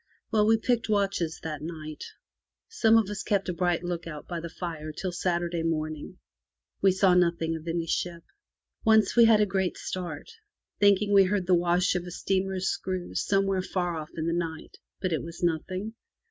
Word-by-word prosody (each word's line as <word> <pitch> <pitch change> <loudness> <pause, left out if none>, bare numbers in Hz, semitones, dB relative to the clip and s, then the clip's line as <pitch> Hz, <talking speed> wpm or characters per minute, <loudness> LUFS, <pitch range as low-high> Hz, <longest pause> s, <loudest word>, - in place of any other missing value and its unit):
Well, 215 -2 +3
we 225 0 +5
picked 230 0 0
watches 195 -6 0
that 155 -2 -4
night. 155 -1 -7 0.6
Some 225 - +4
of 220 -3 +2
us 210 0 -4
kept 200 -2 0
a - - 0
bright 175 0 0
look 175 -1 -4
out 150 -3 -8
by 175 -1 -4
the 170 0 -6
fire 160 -3 -5
till 185 +4 -4
Saturday 175 -1 -1
morning. 155 +1 -3 0.6
We 195 - +5
saw 190 0 +4
nothing 170 -2 +2
of 160 +1 -8
any 165 0 -1
ship. 170 0 -2 0.6
Once 220 -3 +4
we 235 -1 +8
had 220 -2 +6
a - - +5
great 190 -2 -1
start, 175 -5 -5 0.5
thinking 205 0 +4
we 195 -1 +7
heard 190 0 0
the 185 - +3
wash 175 +1 +3
of 180 -1 -2
a - - -7
steamer's 190 +1 -1
screws 185 -1 -2
somewhere 195 -1 +1
far 175 -2 -2
off 155 -1 -6
in 160 - -3
the 165 - 0
night; 165 -2 -4 0.2
but 185 -3 -1
it 160 - 0
was 170 +1 -9
nothing. 185 +6 -1
180 Hz, 190 wpm, -27 LUFS, 165-195 Hz, 0.6 s, we